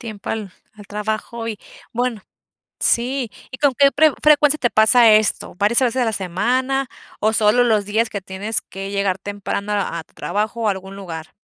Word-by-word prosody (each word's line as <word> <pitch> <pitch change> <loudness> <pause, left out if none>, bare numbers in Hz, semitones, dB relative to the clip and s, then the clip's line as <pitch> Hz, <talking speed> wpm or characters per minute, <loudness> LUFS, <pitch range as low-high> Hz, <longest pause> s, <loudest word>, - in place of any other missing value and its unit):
Tiempo 215 -4 -7
al 210 -4 -4 0.2
al 205 -1 -14
trabajo 215 +2 -4
y 215 -2 -5 0.3
bueno, 240 -3 -2 0.6
sí. 245 0 0 0.2
¿Y 255 - -7
con 285 -2 +3
qué 280 -1 +5
pre 310 0 +4
frecuencia 300 0 +5
te 240 - +1
pasa 225 +2 +6
esto? 215 -1 +1
¿Varias 210 +6 +3
veces 255 0 +1
a - - +2
la 225 - -1
semana, 245 +9 -1 0.3
o 215 +1 +2
solo 220 +2 +3
los 215 -4 +2
días 220 +2 0
que 200 - -4
tienes 195 +4 -2
que 195 +1 -8
llegar 200 -2 0
temprano 200 +1 -4
a 180 -5 -2
tu - - -33
trabajo 215 +3 -3
o - - +2
algún 190 -1 -4
lugar? 165 -5 -8
215 Hz, 185 wpm, -20 LUFS, 200-245 Hz, 0.6 s, pasa